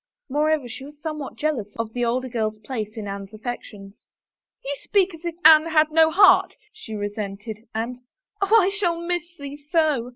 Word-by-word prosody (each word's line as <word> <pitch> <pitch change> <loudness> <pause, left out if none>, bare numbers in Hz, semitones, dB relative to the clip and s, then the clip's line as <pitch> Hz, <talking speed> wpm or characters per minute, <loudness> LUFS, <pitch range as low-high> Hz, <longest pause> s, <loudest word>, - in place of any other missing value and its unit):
Moreover, 300 -1 +1
she 245 +3 -8
was 290 +1 -12
somewhat 305 -3 -5
jeal 305 -3 0
ous 205 -1 -10
of 230 -1 -4
the 245 - -1
older 250 +2 0
girl's 220 -3 -2
place 215 -1 -6
in 210 -2 -5
Anne's 200 +1 -7
affections. 210 -3 -8 0.6
"You 285 +1 -2
speak 390 -3 +2
as 325 0 -12
if 340 -1 -3
Anne 315 0 +8
had 310 -1 +3
no 320 0 +5
heart," 390 +5 +5 0.2
she 340 - -10
cesented, 205 +1 -5
and, 235 +3 -3 0.2
" - - -48
Oh, 420 +3 +5
I 370 - +2
shall 365 -5 0
miss 345 0 -3
thee 285 0 -7
so 305 -8 +2
275 Hz, 190 wpm, -23 LUFS, 220-320 Hz, 0.6 s, Anne